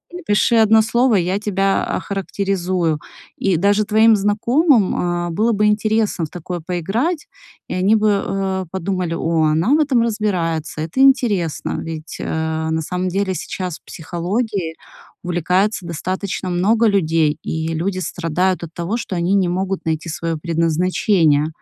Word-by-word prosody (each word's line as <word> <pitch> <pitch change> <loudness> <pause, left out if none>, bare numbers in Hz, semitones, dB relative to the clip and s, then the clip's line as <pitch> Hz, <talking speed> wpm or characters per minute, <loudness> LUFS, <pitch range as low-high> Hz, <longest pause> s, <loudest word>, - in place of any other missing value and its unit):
"Напиши 235 - +1
1 220 0 +6
слово, 235 +2 +2
я 185 +1 +1
тебя 195 -2 0
охарактеризую". 185 -4 -1 0.4
И 190 -4 +1
даже 200 +4 +3
твоим 220 +1 +5
знакомым, 220 - +2 0.3
э, - - -3
было 220 +7 +1
бы 210 0 +2
интересно 210 -3 +1
в - - -10
такое 175 +1 -6
поиграть, 195 - -2 0.4
и - - -5
они 190 +4 +3
бы, 215 0 +2 0.2
э, 190 -1 -2
подумали: 185 -2 -2
"О, 165 -1 +1
она 165 - +2
в 305 - +4
этом 270 -6 +2
разбирается, 175 -9 -1
это 165 +10 -4
интересно", 230 - +2
ведь, 160 0 -7
э, 160 0 -2
на 160 0 0
самом 180 +3 -3
деле 190 +1 -1
сейчас 180 -2 -5
психологией 175 +2 -3 0.5
увлекается 180 +4 0
достаточно 185 +3 -3
много 210 +6 +2
людей, 160 -6 +2
и 160 0 -3
люди 185 +4 -2
страдают 180 +1 -1
от 165 - -7
того, 175 +7 -2
что 200 - -5
они 175 +2 0
не 190 -2 +2
могут 190 +2 -2
найти 160 +1 -2
своё 165 0 -3
предназначение. 165 -1 +1
185 Hz, 145 wpm, -19 LUFS, 165-210 Hz, 0.5 s, 1